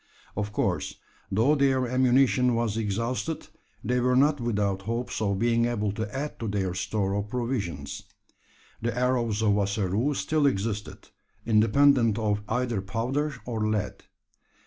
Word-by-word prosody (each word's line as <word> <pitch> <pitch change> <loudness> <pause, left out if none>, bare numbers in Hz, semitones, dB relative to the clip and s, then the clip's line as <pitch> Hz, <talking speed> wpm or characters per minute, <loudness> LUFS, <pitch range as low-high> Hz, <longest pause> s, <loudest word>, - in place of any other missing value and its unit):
Of 105 0 -2
course, - - -1 0.4
though 115 +9 +3
their 135 -3 +2
ammunition 125 0 +3
was 115 -2 0
exhausted, 115 +8 -2 0.3
they 125 0 +1
were 125 +1 +2
not 145 +1 +3
without 100 -4 0
hopes 115 +3 -3
of 100 -2 +1
being 115 +1 +2
able 105 -4 0
to 105 +1 -4
add 145 +3 -4
to 115 - -3
their 100 -3 -1
store 95 +1 -1
of 100 0 -2
provisions. 105 - -3 0.8
The 120 +1 -2
arrows 120 -4 +1
of 105 -2 +3
Ossaroo 100 +7 0
still 155 0 +1
existed, 105 -3 -3 0.4
independent 115 +1 +4
of 105 -2 0
either 120 -3 0
powder 125 +9 -2
or 110 -3 -1
lead. 110 -2 -2
115 Hz, 140 wpm, -27 LUFS, 105-125 Hz, 0.8 s, independent